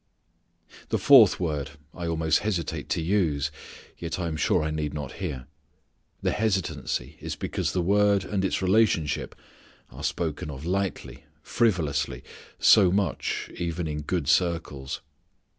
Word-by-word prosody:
The - - +1
fourth 125 -9 +7
word, 75 -4 -2 0.2
I 85 -2 -5
almost 80 -2 +2
hesitate 95 -7 -3
to - - 0
use, 80 -6 +1 0.5
yet 85 +1 -4
I 90 - -2
am 80 -2 -2
sure 75 - +2
I 80 - -1
need 75 -1 -3
not 75 -4 -5
here. 70 -9 -4 0.8
The - - +2
hesitancy 95 - -2
is - - -4
because - - -2
the 90 - 0
word 100 +1 +3
and 95 -1 -1
its 95 0 0
relationship 95 -6 +2 0.6
are - - -10
spoken 80 -2 -2
of 70 +1 -7
lightly, 95 0 -3 0.2
frivolously, 75 - 0 0.3
so 95 -4 +6
much, 100 0 -1
even 85 -1 -2
in 75 0 -3
good 80 -1 -2
circles. 80 -5 0
85 Hz, 140 wpm, -26 LUFS, 75-95 Hz, 0.8 s, fourth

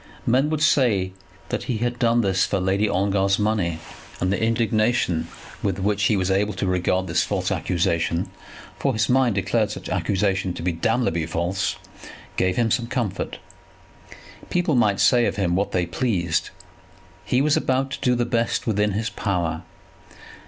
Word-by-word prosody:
Men 130 +5 +3
would 155 -1 0
say 105 -11 +2 0.4
that - - -3
he 120 - -1
had 120 +2 -2
done 120 -1 +3
this 95 -3 +2
for 100 - 0
Lady 95 +3 +1
Ongar's 95 +1 +1
money; 105 -6 0 0.4
and 90 +1 +1
the 100 - -1
indignation 110 -6 +1 0.3
with 95 -3 -1
which 100 +1 0
he 105 0 +3
was 95 0 0
able 100 +1 +1
to 95 - -2
regard 90 0 +1
this 85 -3 +1
false - - -2
accusation, 85 -1 0 0.5
for 135 - +1
his 110 -1 0
mind 125 -4 +3
declared 100 - +1
such - - -7
accusation 95 -2 0
to - - -6
be 90 - +1
damnably 85 -2 0
false, 85 +3 -1 0.6
gave 90 0 +1
him 115 -2 +1
some 120 +2 +1
comfort. 115 -6 -3 1.1
People 175 -3 +1
might 110 -6 +3
say 120 -2 +4
of - - -2
him 90 -4 0
what 100 +2 0
they 90 -1 +1
pleased. 85 -4 -1 0.7
He 125 - +1
was 145 +2 +3
about 130 +1 0
to 140 - -5
do 125 -1 +2
the 120 0 0
best 115 -1 0
within 105 -2 +1
his 110 +2 -2
power. 85 -6 -2
100 Hz, 165 wpm, -23 LUFS, 90-120 Hz, 1.1 s, say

